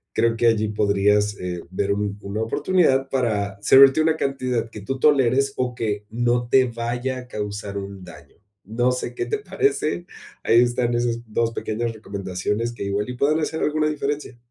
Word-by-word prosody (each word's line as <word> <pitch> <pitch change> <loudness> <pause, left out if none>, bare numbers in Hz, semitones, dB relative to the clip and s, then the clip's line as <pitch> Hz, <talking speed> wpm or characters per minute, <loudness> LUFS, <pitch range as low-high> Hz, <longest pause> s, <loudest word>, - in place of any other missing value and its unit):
creo 115 0 +2
que 120 - +1
allí 110 -2 +2
podrías, 105 0 +2
eh, 90 -1 -4
ver 100 +2 -1
un 100 0 -2
una 100 +2 -4
oportunidad 135 +2 +2
para 105 -7 -1
servirte 135 +5 +7
una 160 0 +2
cantidad 130 -5 -1
que 110 - -9
tú 130 +6 -4
toleres 135 -1 +3
o 125 -1 -1
que 105 -3 -3
no 120 +1 0
te 130 -1 +5
vaya 120 +2 -3
a 125 - -11
causar 105 -3 -5
un 100 -1 -8
daño, 90 - -14 0.3
no 120 +5 0
sé 125 -1 -4
qué - - -2
te 430 - -2
parece, 180 - -1 0.4
ahí 115 +1 +5
están 120 0 +1
esas 120 -1 0
2 115 +1 0
pequeñas 115 +1 -3
recomendaciones 105 +2 -3
que 120 - -6
igual 100 +3 -2
y 125 - -5
puedan 150 +4 +2
hacer 160 0 -2
alguna 155 0 +1
diferencia. 145 -3 -3
120 Hz, 180 wpm, -23 LUFS, 105-130 Hz, 0.4 s, servirte